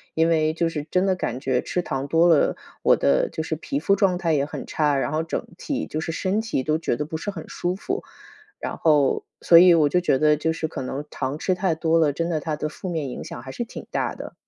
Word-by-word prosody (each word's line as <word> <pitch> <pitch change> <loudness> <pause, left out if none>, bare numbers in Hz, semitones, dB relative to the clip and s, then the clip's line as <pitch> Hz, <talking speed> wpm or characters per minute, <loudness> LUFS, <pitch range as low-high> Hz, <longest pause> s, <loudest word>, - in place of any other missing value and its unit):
因 165 +1 +3
为 155 -1 +2
就 165 +1 0
是 150 -3 -4
真 185 +1 +2
的 190 - +2
感 125 -8 -3
觉 130 -2 0
吃 180 - -2
糖 135 -2 -3
多 165 +4 +4
了， 165 -4 +4 0.3
我 - - +5
的 70 -1 +2
就 160 - -4
是 160 - -2
皮 145 -3 -4
肤 180 +6 +2
状 190 -2 +2
态 170 -2 0
也 140 -2 +2
很 150 - -7
差， 150 -2 +1
然 135 - -1
后 155 +1 0
整 165 - -3
体 285 -1 -3
就 155 - -4
是 165 - -3
身 190 +6 0
体 225 -12 -2
都 155 +2 +1
觉 160 - -1
得 150 - -3
不 160 +1 -5
是 180 - -5
很 180 -6 -7
舒 175 +1 -2
服。 380 - -4 0.6
然 - - -4
后 150 -4 +3 0.2
所 170 - +6
以 175 +1 +8
我 155 -3 +4
就 180 +5 +2
觉 170 - +2
得 150 +1 +4
就 155 +2 -1
是 160 0 -2
可 145 - -6
能 135 +3 -4
糖 135 +3 -4
吃 185 +2 0
太 180 -2 0
多 160 +1 +2
了， 155 -3 +3
真 165 +4 -2
的 160 -3 -1
它 155 -1 -3
的 150 - -2
负 180 +4 -7
面 160 -5 -2
影 125 - -6
响 - - -8
还 130 +2 -9
是 240 - -3
挺 235 - -9
大 - - -2
的。 - - -8
160 Hz, 285 characters per minute, -24 LUFS, 145-175 Hz, 0.6 s, 以